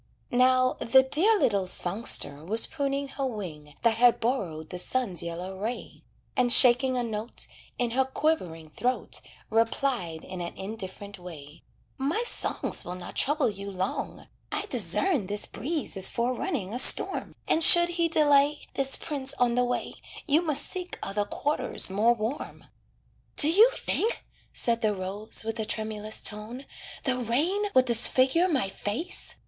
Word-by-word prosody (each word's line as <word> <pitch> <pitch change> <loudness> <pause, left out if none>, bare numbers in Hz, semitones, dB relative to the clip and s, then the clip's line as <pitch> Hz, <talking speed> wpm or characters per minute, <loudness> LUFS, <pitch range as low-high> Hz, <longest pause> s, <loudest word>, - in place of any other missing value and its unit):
Now, 255 +1 +2
the 265 +3 +4
dear 360 +12 +3
little 200 - 0
songster 175 -6 +1
was 220 +7 +2
pruning 280 -2 -3
her 275 0 -4
wing 155 - -8
That 230 -1 +2
had 240 0 +4
borrowed 175 - -3
the 180 - -5
sun's 195 -4 -1
yellow 175 +3 -7
ray, 225 +4 -6 0.3
And 245 -1 +2
shaking 255 +1 +5
a 245 - -1
note 220 0 -4 0.3
In 245 -1 -1
her 265 +2 +1
quivering 180 - -3
throat, 250 +9 -3 0.3
Replied 225 -7 -1
in 185 -1 -8
an 170 - -7
indifferent 200 -1 -8
way: 155 -5 -12 0.4
"My 300 - -1
songs - - -2
will 180 - -7
not 180 -1 -10
trouble 295 +1 +2
you 200 -2 -6
long. 190 0 -5 0.2
I - - -3
discern 315 - +3
This 205 +1 0
breeze 305 +5 -5
is 190 -1 +3
forerunning 245 - -3
a 245 - -1
storm, - - +5
And 325 - +3
should 345 +1 +9
he 340 -1 -1
delay 290 -1 +2
(This 270 0 0
prince) 280 -2 0
on 245 -2 +1
the 250 +1 +1
way, 245 0 -3 0.3
You 305 +1 +2
must 310 -5 +1
seek 365 -1 -5
other 205 +1 -2
quarters 290 -3 +1
more 220 +5 +2
warm." 225 +6 -6 0.7
"Do 305 +1 +6
you 430 +8 +6
think," 455 +3 -2 0.3
said 230 -1 0
the 215 -2 0
rose, 195 +4 -1
with 225 +1 -5
a 220 - -2
tremulous 215 0 -4
tone, 225 +6 -5 0.4
"The 255 -2 -1
rain 305 - 0
would 255 0 +5
disfigure 255 +7 +3
my 275 - -1
face?" 215 - -5
240 Hz, 155 wpm, -26 LUFS, 200-275 Hz, 0.7 s, should